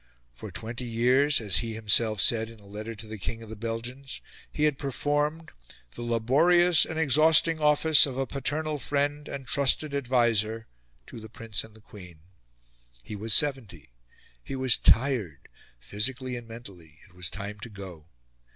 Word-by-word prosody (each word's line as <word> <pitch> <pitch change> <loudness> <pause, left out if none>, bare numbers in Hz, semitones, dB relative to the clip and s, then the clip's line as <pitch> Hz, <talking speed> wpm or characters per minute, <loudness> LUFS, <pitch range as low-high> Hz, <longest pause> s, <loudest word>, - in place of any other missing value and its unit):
For - - -9
twenty 115 +3 -5
years, 125 +5 +3
as 100 -6 0
he 115 +2 -2
himself 110 0 +2
said 115 -1 +2
in 115 -1 -14
a 100 - -18
letter 105 +3 -7
to 110 +1 -10
the 110 -1 -8
King 115 +4 -5
of 110 - -12
the - - -6
Belgians, 120 +5 -6 0.3
he 150 - -2
had 150 -3 +1
performed 145 +3 -2 0.4
"the - - -9
laborious 145 +9 +3
and 160 - -6
exhausting 160 +2 +4
office 150 0 +5
of 130 -2 -6
a 135 - 0
paternal 150 +3 -3
friend 145 +2 -2
and 135 -1 -7
trusted 140 +3 +1
adviser" 120 -5 0 0.4
to - - -10
the 110 0 -11
Prince 115 -2 -3
and 110 -1 -15
the 110 - -17
Queen. 90 -7 -14 0.8
He 105 - -8
was 110 +2 -3
seventy; 115 - -1 0.5
he - - -6
was 130 -3 +3
tired, 115 - +1 0.3
physically 125 - -3
and 120 -1 -8
mentally; 95 -10 -12
it 95 - -24
was 90 -2 -4
time 105 +1 -7
to 100 - -8
go. 95 -7 -11
120 Hz, 165 wpm, -27 LUFS, 110-140 Hz, 0.8 s, office